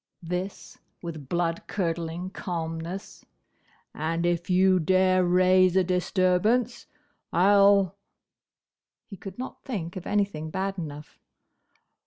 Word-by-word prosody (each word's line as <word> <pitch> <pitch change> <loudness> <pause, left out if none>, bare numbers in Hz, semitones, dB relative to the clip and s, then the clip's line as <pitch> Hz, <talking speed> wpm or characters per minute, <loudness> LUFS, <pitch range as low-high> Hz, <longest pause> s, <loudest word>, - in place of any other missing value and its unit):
this 180 +3 -5 0.2
with 155 -5 -7
blood 170 -1 -1
curdling 170 -1 -3
calmness. 170 +2 -5 0.7
"And 165 +2 -2
if 175 +1 -1
you 185 0 +4
dare 185 +2 +3
raise 185 +1 +4
a 190 - +4
disturbance, 185 +6 +1 0.4
I 190 +4 +4
'll—" 200 -2 +5 1.1
he 200 - -10
could 190 0 -9
not 255 +1 -7
think 190 - -5
of 185 -1 -7
anything 200 -7 -1
bad 195 +3 -3
enough. 150 -2 -8
180 Hz, 110 wpm, -26 LUFS, 170-195 Hz, 1.1 s, ll